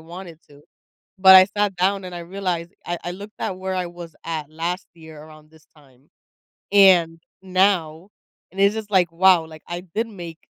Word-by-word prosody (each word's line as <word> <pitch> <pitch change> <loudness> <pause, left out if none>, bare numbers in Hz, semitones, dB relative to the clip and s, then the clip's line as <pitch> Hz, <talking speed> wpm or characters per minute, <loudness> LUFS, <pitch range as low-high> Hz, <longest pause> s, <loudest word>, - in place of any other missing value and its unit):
wanted 170 0 -11
to." 145 0 -18 0.6
But, 190 0 +9
I 185 - +9
sat 205 -2 0
down 195 +2 0
and 180 -1 -8
I - - -6
realized 175 -1 -4
I 175 0 -3
I 175 - -4
looked 200 +4 -11
at 185 - -4
where 190 0 -4
I 180 -1 -2
was 170 -2 -11
at 155 -3 -5
last 170 +4 -4
year 160 -2 -13
around 155 0 -17
this 160 0 -22
time 135 -2 -24 0.6
and 180 -5 +5 0.2
now, 185 -2 0 0.4
and 195 +1 -4
it's 200 +2 +3
just 215 -1 -7
like, 180 -4 +2
"Wow, 180 -1 +4
like, 155 -1 -14
I 175 0 -5
did 225 +2 -1
make 175 -6 -10
175 Hz, 190 wpm, -21 LUFS, 160-190 Hz, 0.6 s, But